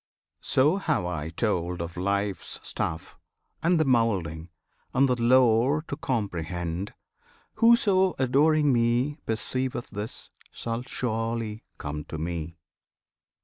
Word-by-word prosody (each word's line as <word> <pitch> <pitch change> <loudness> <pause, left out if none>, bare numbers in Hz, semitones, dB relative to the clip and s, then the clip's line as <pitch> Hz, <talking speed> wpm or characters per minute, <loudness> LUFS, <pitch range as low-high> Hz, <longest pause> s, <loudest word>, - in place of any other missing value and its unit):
So 150 +8 +3
have 155 - 0
I 80 -3 -3
told 90 -1 -1
Of 85 0 -5
Life's 100 +2 -2
stuff, 80 +1 -4 0.4
and 170 +1 +3
the 155 - +3
moulding, 95 - +1 0.5
and 135 +2 +5
the 125 - +2
lore 130 +4 +4
To - - -2
comprehend. 90 - -3 0.6
Whoso, 205 -5 +4
adoring 145 +3 +3
Me, 120 +5 +1
Perceiveth 125 +2 -2
this, 105 +1 -6 0.2
shall 115 0 -4
surely 115 -3 -3 0.2
come 75 +1 -5
to 80 - -6
Me! 85 0 -4
115 Hz, 110 wpm, -27 LUFS, 90-135 Hz, 0.6 s, and